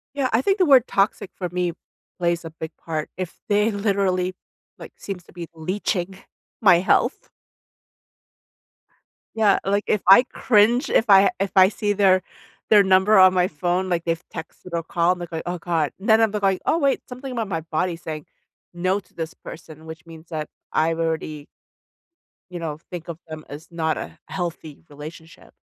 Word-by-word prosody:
Yeah, 275 -2 0
I 225 +3 +3
think 390 +7 +1
the 370 - +4
word 265 -4 +6
toxic 195 -1 0
for 180 - -4
me 180 0 -1 0.5
plays 170 -1 0
a 165 - -6
big 160 0 -7
part 155 -2 -4
if 185 -1 -6
they 210 +2 +2
literally, 195 -3 0 0.4
like, - - -11
seems 190 -3 -7
to - - -19
be 170 -2 -8
leeching 185 +2 -3 0.4
my 195 -5 +6
health. 185 - +1 2.1
Yeah, 215 -3 +4
like, 200 +1 +1
if 210 - +2
I 195 +6 +9
cringe, 240 0 +2
if 225 - +2
I 195 0 +7
if 195 -1 0
I 185 0 +8
see 205 0 -1
their 190 -2 +3 0.5
their 205 -2 +7
number 190 +2 +5
on 185 0 +7
my 180 0 +2
phone, 175 +4 -1
like, 170 -2 -1
they've 165 0 -1
texted 160 +2 -9
or 170 -1 -1
called, 175 +2 +1
they're 175 -1 -6
like, 160 -1 -4
"Oh 175 0 -3
god," 165 -3 -1
and 195 - -8
then 220 0 +6
I'd 225 -2 +3
look, 210 -1 -3
like, 190 -1 +2
"Oh, 330 - +2
wait." 280 -4 +1
Something 255 +1 -7
about 230 -4 -3
my 165 -4 -3
body 165 +2 -2
saying 155 -2 -7 0.5
"no" 185 +3 0
to 185 - -30
this 165 -1 -5
person, 160 -1 -12
which 160 +1 -10
means 165 0 -13
that 155 -2 -4 0.2
I've 165 +1 +1
already 160 -2 -3 1.0
you 180 - -6
know, 155 -3 -5
think 175 -2 -7
of 165 -2 -6
them 155 -1 -8
as 150 +3 -10
not 160 -2 -1
a - - -7
healthy 165 -5 -6
relationship. 155 +3 -12
180 Hz, 180 wpm, -23 LUFS, 165-200 Hz, 2.1 s, I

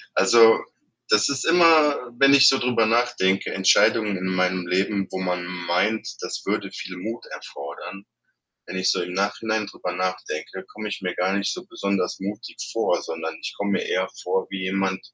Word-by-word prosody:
Also, 115 +3 +6 0.5
das 105 - +4
ist 140 -1 -1
immer 160 -6 +4
wenn 140 0 +6
ich 140 -2 +8
so 135 - +5
drüber 120 -2 +2
nachdenke, 110 -5 +1
Entscheidungen 100 +2 +3
in 95 +1 -4
meinem 90 -1 0
Leben, 95 +2 0
wo 95 - -4
man 90 -1 -2
meint, 90 +4 -1
das - - -5
würde - - -2
viel 90 -1 -7
Mut 110 +6 -6
erfordern. 70 +7 -9 0.6
Wenn 95 - -5
ich 95 - +2
so - - 0
im 90 0 -5
Nachhinein 105 +2 -1
drüber 90 -2 -6
nachdenke, 95 -1 -4
komme 105 0 -6
ich 100 - -5
mir 90 -1 -3
gar 95 +2 0
nicht 100 0 0
so - - -8
besonders 100 -2 -2
mutig 105 +4 -6 0.2
vor, - - 0
sondern 80 0 -5
ich - - -5
komme 100 0 -2
mir - - -1
eher 95 0 -1
vor 95 +1 -1
wie 95 -1 -4
jemand 95 0 -1
95 Hz, 180 wpm, -23 LUFS, 90-110 Hz, 0.6 s, ich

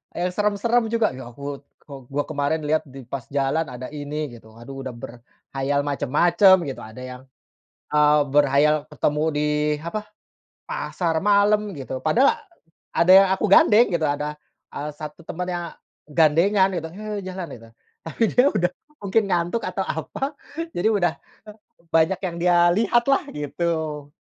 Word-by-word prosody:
eee, 180 +1 -1
serem-serem 210 +4 +1
juga. 230 -5 +1
Ya 130 -2 -9
aku, 140 +3 -7 0.2
kok 140 -2 -10
gua 145 +1 -1
kemarin 150 +1 -2
lihat 155 +1 +2
di 135 -1 -11
pas 130 0 -7
jalan 140 +3 0
ada 125 0 -7
ini 150 +1 -4
gitu, 110 -1 -16
aduh 135 +3 -8
udah 130 - -5
berkhayal 135 +4 -5
macem-macem 170 +8 +4
gitu, 135 -2 -6
ada 110 +3 -11
yang, 125 0 -8 0.7
eee, 150 0 +4
berkhayal 145 +1 +4 0.2
ketemu 150 +1 0
di, 150 0 0 0.3
apa, 210 +6 -5 0.6
pasar 175 - -2
malam 205 +1 +3
gitu, 130 -1 -5
padahal 240 - +4 0.6
ada 170 +2 +4
yang 195 +1 +8
aku 205 - -1
gandeng 220 +4 +6
gitu, 160 -2 +1
ada, 150 +1 -2 0.4
eee, 145 +1 -4
1 150 +2 -9
temen 180 +2 -4
yang 175 -1 -3 0.4
gandengan 170 +6 +3
gitu, 160 -2 -3
he, 210 +2 -5
jalan 185 -2 -5
gitu. 115 -1 -14 0.4
Tapi 165 +8 -2
dia 250 - +4
udah 175 0 0 0.3
mungkin 205 +3 +2
ngantuk 175 +4 0
atau - - -2
apa, 280 +2 -4 0.4
jadi 175 - +1
udah 175 -6 +1 0.8
banyak 165 +3 +3
yang 175 -2 -3
dia 175 0 +4
lihatlah 235 +7 +2
gitu. 150 0 -3
160 Hz, 150 wpm, -23 LUFS, 140-190 Hz, 0.8 s, yang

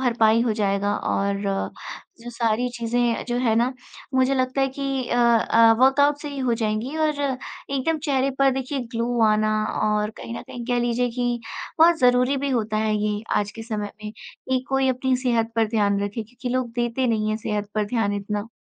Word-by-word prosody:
भरपाई 230 -3 +3
हो 235 -2 +1
जाएगा 200 +1 +1
और 200 0 -1 0.5
जो 240 +1 -8
सारी 230 +1 0
चीज़ें 240 0 -1
जो 240 - 0
हैं 240 -3 +2
ना, 240 +3 +2 0.4
मुझे 260 +1 +3
लगता 255 +1 0
है 270 - +2
कि 270 -1 -3
अ - - 0
अ, 230 -1 +5
वर्कआउट 285 +3 +4
से 295 - -5
ही 285 -1 -6
हो 255 -3 +1
जाएँगी 225 +5 -2
और 315 -1 +2 0.6
एकदम 280 +4 0
चेहरे 275 -2 +1
पर 275 0 +5
देखिए 265 +1 -3
ग्लो 235 +1 -1
आना 215 0 +2 0.3
और 210 0 +1
कहीं 230 - -7
न - - -8
कहीं 245 -1 -8
कह 245 -1 +1
लीजिए 240 +1 0
कि 240 0 -1 0.4
और 340 0 +5
ज़रूरी 250 -1 +3
भी 280 +1 -2
होता 220 -4 0
है 215 0 +1
ये 210 0 -1
आज 205 -1 0
के 225 - -8
समय 210 -3 -4
में। 210 - -5 0.4
एक 255 +1 -4
कोई 270 0 +2
अपनी 260 0 +1
सेहत 235 -3 0
पर 225 -1 +3
ध्यान 205 -2 +1
रखें 205 +3 -3
क्योंकि 245 +3 -7
लोग 255 -1 -1
देते 240 +2 0
नहीं 215 -2 0
हैं 215 - 0
सेहत 210 -2 -3
पर 215 -1 +1
ध्यान 210 -1 0
इतना। 205 +1 -3
240 Hz, 195 wpm, -23 LUFS, 215-260 Hz, 0.6 s, अ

